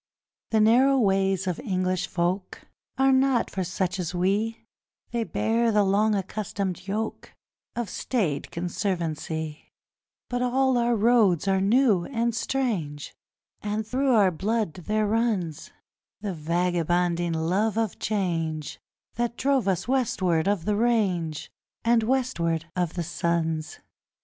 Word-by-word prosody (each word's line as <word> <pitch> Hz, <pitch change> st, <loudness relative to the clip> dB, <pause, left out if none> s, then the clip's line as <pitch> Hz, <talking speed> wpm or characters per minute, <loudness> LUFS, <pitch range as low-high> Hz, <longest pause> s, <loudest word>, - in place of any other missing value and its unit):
The 220 Hz, -, +2 dB
narrow 255 Hz, +5 st, +5 dB
ways 195 Hz, -4 st, +2 dB
of 180 Hz, -3 st, -2 dB
English 185 Hz, -1 st, -1 dB
folk 180 Hz, +2 st, -2 dB, 0.3 s
Are 270 Hz, 0 st, +4 dB
not 265 Hz, -2 st, +2 dB
for 190 Hz, -, -2 dB
such 185 Hz, +1 st, -2 dB
as 180 Hz, 0 st, -3 dB
we; 205 Hz, +6 st, 0 dB, 0.5 s
They 235 Hz, -1 st, 0 dB
bear 230 Hz, +1 st, +1 dB
the 210 Hz, -1 st, +4 dB
long 205 Hz, +2 st, +2 dB
accustomed 195 Hz, -1 st, -3 dB
yoke 215 Hz, +3 st, -4 dB, 0.4 s
Of 240 Hz, -2 st, -2 dB
staid 180 Hz, -, -2 dB
conservancy: 165 Hz, -4 st, -3 dB, 0.6 s
But 245 Hz, 0 st, -2 dB
all 255 Hz, 0 st, +2 dB
our 235 Hz, 0 st, +2 dB
roads 215 Hz, -6 st, +3 dB
are 190 Hz, -1 st, +2 dB
new 210 Hz, -3 st, +3 dB
and 235 Hz, -3 st, -1 dB
strange, 210 Hz, -, -2 dB, 0.5 s
And 210 Hz, +1 st, -2 dB
through 260 Hz, +3 st, +1 dB
our 200 Hz, -4 st, +5 dB
blood 205 Hz, +1 st, -1 dB
there 215 Hz, +5 st, -1 dB
runs 205 Hz, -8 st, -1 dB, 0.5 s
The 205 Hz, -3 st, -3 dB
vagabonding 175 Hz, +1 st, 0 dB
love 185 Hz, +7 st, 0 dB
of 225 Hz, -3 st, -1 dB
change 165 Hz, -7 st, -2 dB, 0.4 s
That 240 Hz, 0 st, -1 dB
drove 270 Hz, -4 st, +1 dB
us 190 Hz, +2 st, 0 dB
westward 190 Hz, -10 st, +1 dB
of 200 Hz, -5 st, 0 dB
the 210 Hz, 0 st, +1 dB
range 195 Hz, -9 st, 0 dB, 0.3 s
And 235 Hz, 0 st, +4 dB
westward 195 Hz, -10 st, 0 dB
of 175 Hz, -3 st, -1 dB
the 175 Hz, -, -1 dB
suns. 165 Hz, -2 st, -1 dB
195 Hz, 130 wpm, -26 LUFS, 175-230 Hz, 0.6 s, narrow